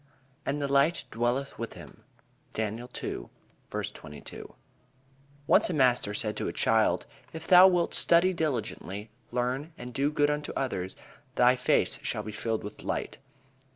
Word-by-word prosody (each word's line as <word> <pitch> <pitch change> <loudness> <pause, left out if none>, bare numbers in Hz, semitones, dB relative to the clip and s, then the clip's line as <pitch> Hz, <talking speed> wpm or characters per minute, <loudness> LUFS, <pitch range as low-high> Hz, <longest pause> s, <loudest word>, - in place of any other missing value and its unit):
"And 140 +2 0
the 140 - -1
light 140 +5 +3
dwelleth 120 +4 -1
with 115 - -4
him." - - -13 0.5
Daniel 110 +3 -3
II: - - -4 0.4
22. 75 -2 -7 0.9
Once - - +4
a 175 - -1
master 125 -7 +3
said 105 0 -1
to - - -2
a - - -1
child: - - +2 0.3
"If 160 0 -7
thou 185 +1 +9
wilt 175 -2 +1
study 175 +2 +5
diligently, 115 - -3 0.2
learn, 125 +6 -2
and 125 0 -8
do 140 +3 +1
good 145 -1 +2
unto 150 0 -3
others, 95 -9 -2 0.4
thy 125 +1 +5
face 125 - +2
shall 105 - -2
be 110 - -6
filled 110 +1 -2
with 105 +1 -8
light." - - -3
125 Hz, 150 wpm, -28 LUFS, 110-150 Hz, 0.9 s, thou